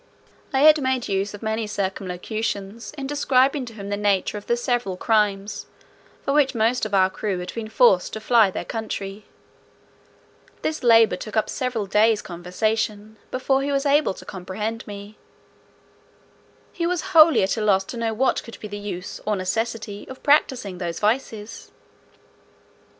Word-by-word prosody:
I 270 - +1
had 305 0 +7
made 260 -2 0
use 195 +1 -1
of 205 - -12
many 220 0 -1
circumlocutions 200 +2 -4
in 275 - -4
describing 270 -1 +2
to 230 - -10
him 200 -2 -8
the 205 - 0
nature 205 -1 +1
of 205 - -7
the 235 - +2
several 240 -6 -1
crimes 210 -1 0 0.6
for 275 - 0
which 285 -3 +3
most 230 +1 +1
of 205 - -2
our 190 -1 +5
crew 200 -1 -2
had 180 0 -6
been 225 -2 -5
forced 220 -5 +4
to 220 - -4
fly 220 -2 +4
their - - -5
country. 210 -2 -5 1.4
This 310 - -2
labour 225 -6 +5
took 215 +4 -6
up 215 - +1
several 250 -5 -2
days' 210 +2 +3
conversation, 210 +4 -2
before 265 +1 +1
he 280 +1 -1
was 275 +1 0
able 285 -7 +3
to - - -12
comprehend 210 +4 -5
me. 205 +1 -9 1.5
He 340 -1 -1
was 355 -1 0
wholly 315 - +7
at 190 - +1
a 225 - -3
loss 195 -2 +3
to 235 - -8
know 230 -1 -1
what 255 +4 +1
could 230 - -11
be 210 - -7
the 205 0 -6
use 190 -3 -6
or 210 - +2
necessity 205 +2 -3
of 260 - -10
practising 255 -10 +2
those 170 -2 -3
vices. 220 -1 -2
220 Hz, 165 wpm, -23 LUFS, 200-250 Hz, 1.5 s, had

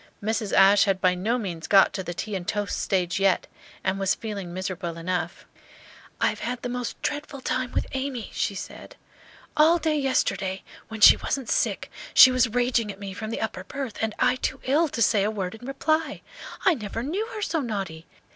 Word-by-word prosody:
Mrs. 220 -1 -1
Ashe 195 +1 +6
had 195 -2 +1
by 185 -1 +3
no 210 +7 0
means 175 -8 -5
got 195 -1 +5
to 190 - -3
the 175 -1 -6
tea 215 +4 -5
and 180 -2 -5
toast 205 -1 -2
stage 180 -1 0
yet, 195 -1 +2 0.4
and 190 0 0
was 195 -1 +2
feeling 200 -5 -6
miserable 180 -2 -4
enough. 175 +2 -3 0.7
"I - - +3
have - - -5
had 245 +1 -4
the 245 - -2
most 245 -1 -4
dreadful 290 -1 -3
time 255 -1 -2
with - - -1
Amy," 265 -4 -4
she 200 - -1
said. - - -9 0.6
"All 315 +3 +5
day 315 -2 0
yesterday, 195 -8 0 0.2
when 220 -1 -8
she - - +9
wasn't 270 -4 -3
sick - - 0 0.2
she 260 - +10
was 255 -1 +2
raging 240 -2 +1
at 195 - -13
me 200 -1 -6
from 215 +3 -6
the 230 - -4
upper 220 -4 -3
berth, 265 +1 -6
and 220 -1 -1
I 255 - +2
too 260 +1 -3
ill 300 +6 +2
to 235 -5 0
say 205 -1 +3
a 205 - +1
word 195 -4 -3
in 225 +3 -10
reply. 310 +3 -1 0.4
I 375 - +6
never 225 -3 -5
knew 380 - -2
her 425 - -3
so 325 -3 0
naughty! 195 - -5
220 Hz, 205 wpm, -25 LUFS, 190-255 Hz, 0.7 s, she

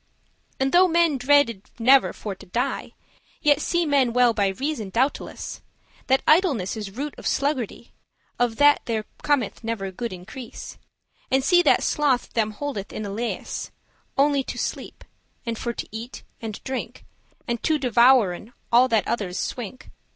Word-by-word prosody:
And 265 0 +1
though 365 +1 +6
men 335 -5 +2
dreaded 250 -6 +2
never 260 +3 +5
for 205 - -6
to 190 - -14
die, 235 +7 -2 0.5
Yet 295 -1 +3
see 345 +1 +1
men 275 -5 +2
well 245 -1 +4
by 200 -2 +1
reason, 230 +1 -3
doubteless, 255 +8 -2 0.5
That 265 0 +3
idleness 300 - +3
is 210 -2 -5
root 290 +2 -3
of - - -4
sluggardy, 265 -5 -2 0.5
Of 240 -2 0
which 290 0 +6
there 220 -2 -2 0.2
cometh 275 -7 0
never 220 -4 -3
good 235 +5 -5
increase; 215 +7 -9 0.5
And 265 0 +2
see 350 +5 +5
that 315 - +3
sloth 280 -5 +1
them 220 -2 +1
holdeth 210 -5 -5
in 215 - -5
a 200 - -5
leas,* 230 +3 -2
*leash - - -6
<2> - - -27 0.5
Only 285 -2 +2
to - - -6
sleep, - - -5 0.4
and 230 -1 -2
for 235 +1 -3
to - - -6
eat 225 +3 -7 0.2
and 220 -3 -6
drink, 260 -1 -5 0.4
And 235 -2 -2
to 315 -1 +2
devouren 240 -5 +3 0.2
all 245 +2 +6
that 225 -4 +1
others 200 -6 -2
swink. 245 +1 -5
245 Hz, 165 wpm, -24 LUFS, 220-285 Hz, 0.5 s, though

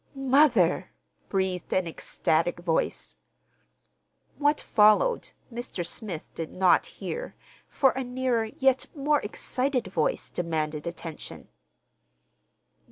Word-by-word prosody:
"Mother!" 265 - +3 0.4
breathed 190 -2 -1
an 185 - +2
ecstatic 165 0 0
voice. 165 -2 -1 1.2
What 295 +1 +3
followed 215 - +4 0.2
Mr. 230 -7 -4
Smith 175 -3 -6
did 165 -1 -5
not 185 - +3
hear, - - -6 0.3
for 270 -2 +3
a 265 - -3
nearer, 250 -2 0
yet 265 +4 +1
more 295 +1 +2
excited, 255 +4 -1
voice 160 -5 -1
demanded 155 -3 -2
attention. 170 -2 -7
215 Hz, 100 wpm, -27 LUFS, 170-265 Hz, 1.2 s, followed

